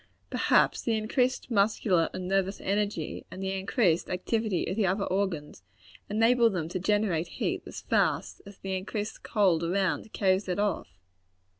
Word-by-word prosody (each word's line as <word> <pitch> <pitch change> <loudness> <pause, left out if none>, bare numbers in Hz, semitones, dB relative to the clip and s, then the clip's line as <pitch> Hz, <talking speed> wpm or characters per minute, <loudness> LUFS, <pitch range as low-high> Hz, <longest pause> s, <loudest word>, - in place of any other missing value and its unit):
Perhaps - - +3
the 225 -2 0
increased 250 +4 0
muscular 200 -5 +2
and 185 - -5
nervous 195 +1 0
energy, 200 -4 -2
and 190 - -7
the 190 - -1
increased 190 -2 +1
activity 205 +1 -1
of 185 - -3
the 210 -3 +2
other 195 +2 0
organs, 185 - -2 0.5
enable 230 +3 +4
them 175 -6 -2
to 185 - -3
generate 195 -4 +1
heat - - -1
as - - -7
fast, - - 0
as 200 -1 -12
the 190 0 -4
increased 205 +3 -4
cold 185 -7 +2
around 185 +2 0
carries 190 -1 +1
it 180 - -1
off. 205 0 0
195 Hz, 155 wpm, -28 LUFS, 185-215 Hz, 0.5 s, enable